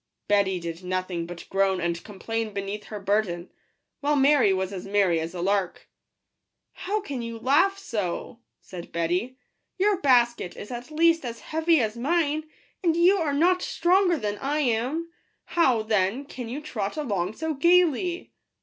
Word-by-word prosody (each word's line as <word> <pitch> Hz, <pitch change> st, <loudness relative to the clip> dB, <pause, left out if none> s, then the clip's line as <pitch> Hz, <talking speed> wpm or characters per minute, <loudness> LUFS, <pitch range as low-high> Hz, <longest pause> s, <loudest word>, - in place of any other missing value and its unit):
Betty 200 Hz, -3 st, +2 dB
did 170 Hz, +1 st, -6 dB
no 185 Hz, 0 st, -1 dB
thing 175 Hz, -2 st, -4 dB
but 175 Hz, 0 st, -9 dB
groan 195 Hz, -1 st, +2 dB
and 170 Hz, 0 st, -2 dB
complain 220 Hz, +1 st, -4 dB
beneath 200 Hz, +1 st, -4 dB
her 210 Hz, -, -7 dB
burden, 195 Hz, -3 st, -1 dB, 0.5 s
while 295 Hz, +1 st, +1 dB
Mary 275 Hz, -6 st, +4 dB
was 190 Hz, +1 st, -1 dB
as 185 Hz, -1 st, -6 dB
merry 195 Hz, -4 st, +2 dB
as 165 Hz, +3 st, -5 dB
a 175 Hz, -, -4 dB
lark. 195 Hz, -1 st, -1 dB, 0.4 s
" -, -, -57 dB, 0.2 s
How 420 Hz, +2 st, 0 dB
can 280 Hz, -11 st, -5 dB
you 230 Hz, 0 st, -5 dB
laugh 305 Hz, -, +3 dB
so 225 Hz, -, -4 dB
!" -, -, -57 dB
said 175 Hz, -2 st, -10 dB
Betty: 180 Hz, +10 st, -1 dB, 0.2 s
" -, -, -53 dB
your 390 Hz, 0 st, +2 dB
basket 240 Hz, -, +2 dB
is 205 Hz, -, -8 dB
at 245 Hz, +2 st, -6 dB
least 330 Hz, +1 st, +3 dB
as 235 Hz, -2 st, -6 dB
heavy 320 Hz, 0 st, +2 dB
as 220 Hz, -2 st, -1 dB
mine, 310 Hz, +3 st, 0 dB, 0.3 s
and 335 Hz, -2 st, +3 dB
you 360 Hz, +4 st, +5 dB
are 320 Hz, -5 st, 0 dB
not 355 Hz, +6 st, +3 dB
stronger 355 Hz, 0 st, +2 dB
than 205 Hz, -4 st, -3 dB
I 290 Hz, +3 st, 0 dB
am; 270 Hz, +7 st, -1 dB, 0.3 s
how, 260 Hz, -10 st, +2 dB
then, 215 Hz, +4 st, 0 dB
can 250 Hz, -4 st, -7 dB
you 275 Hz, +5 st, -5 dB
trot 220 Hz, -7 st, -4 dB
along 205 Hz, -, -1 dB
so 320 Hz, +3 st, -2 dB
gaily 345 Hz, +2 st, +2 dB
235 Hz, 175 wpm, -26 LUFS, 195-310 Hz, 0.5 s, you